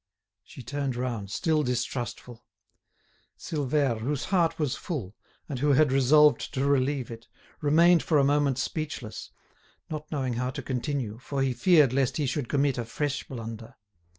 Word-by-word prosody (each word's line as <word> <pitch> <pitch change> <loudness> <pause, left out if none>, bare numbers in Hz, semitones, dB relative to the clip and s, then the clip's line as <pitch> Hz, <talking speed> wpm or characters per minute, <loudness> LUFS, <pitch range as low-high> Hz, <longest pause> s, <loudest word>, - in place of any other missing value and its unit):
She 130 - -12
turned 140 -1 -3
round, 120 -5 -3
still 155 - +1
distrustful. 125 -2 -4 0.9
Silvère, 140 -5 0
whose 135 +4 -2
heart 170 -4 +1
was 150 -5 0
full, 120 - -5 0.3
and 135 -4 -4
who 145 +1 +3
had 145 0 +4
resolved 145 +3 +4
to 135 +1 0
relieve 135 -2 +1
it, 115 0 -10 0.3
remained 165 +3 +5
for 155 - +1
a 140 - +4
moment 140 -1 +2
speechless, 135 -5 -4 0.6
not 155 0 -6
knowing 135 -5 -1
how 125 +2 -2
to - - -6
continue, 125 -4 -3
for 135 +1 -2
he 130 -1 +1
feared 150 -4 +4
lest 135 -2 +1
he 150 - 0
should 135 -1 -2
commit 140 -2 +1
a 120 - -3
fresh 145 +4 -3
blunder. 115 -3 -8
135 Hz, 155 wpm, -27 LUFS, 125-150 Hz, 0.9 s, remained